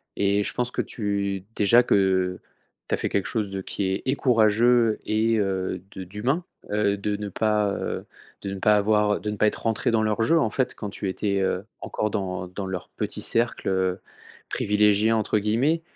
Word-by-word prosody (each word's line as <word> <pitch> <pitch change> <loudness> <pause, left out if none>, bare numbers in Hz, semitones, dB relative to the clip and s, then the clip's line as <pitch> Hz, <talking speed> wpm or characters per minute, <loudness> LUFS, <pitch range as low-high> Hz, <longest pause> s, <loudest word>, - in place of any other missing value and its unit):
et 100 +1 +2
je - - -3
pense 125 0 -1
que - - -1
tu 100 -3 -2
déjà 115 +4 +5
que, - - +1
heu, 95 -2 +2 0.5
tu - - -1
as - - -8
fait - - -2
quelque 100 - 0
chose 110 -4 -1
de 95 0 -3
qui 100 - -3
est 95 - -3
et 130 - +1
courageux 115 -2 +3
et 110 +1 +2
heu, 95 -2 -1
de 95 - -7
d'humain, 110 - -1 0.3
heu, 105 -1 +2
de 105 +1 -2
ne 105 0 -5
pas, 105 +1 +1
heu, - - -4 0.4
de 100 - -3
ne 95 - -6
pas 105 +2 +4
avoir 105 0 +2
de 105 - -4
ne 105 - -4
pas 110 - +4
être - - -2
rentrée 115 -2 0
dans 110 -1 +2
leur 110 +1 0
jeu, 165 +9 +4
en 115 - +1
fait, 125 +3 -1
quand 105 - -5
tu 100 0 -4
étais, 100 +1 -1
heu, 95 +1 -1 0.2
encore 105 - -2
dans 95 -2 -3
dans 95 +2 -6
leur 95 -2 -5
petit - - -3
cercle, 115 +1 0
heu, 95 -1 0 0.5
«privilégié» 105 +1 +3
entre 110 -1 +1
guillemets, 125 +11 +1
105 Hz, 205 wpm, -25 LUFS, 100-110 Hz, 0.5 s, déjà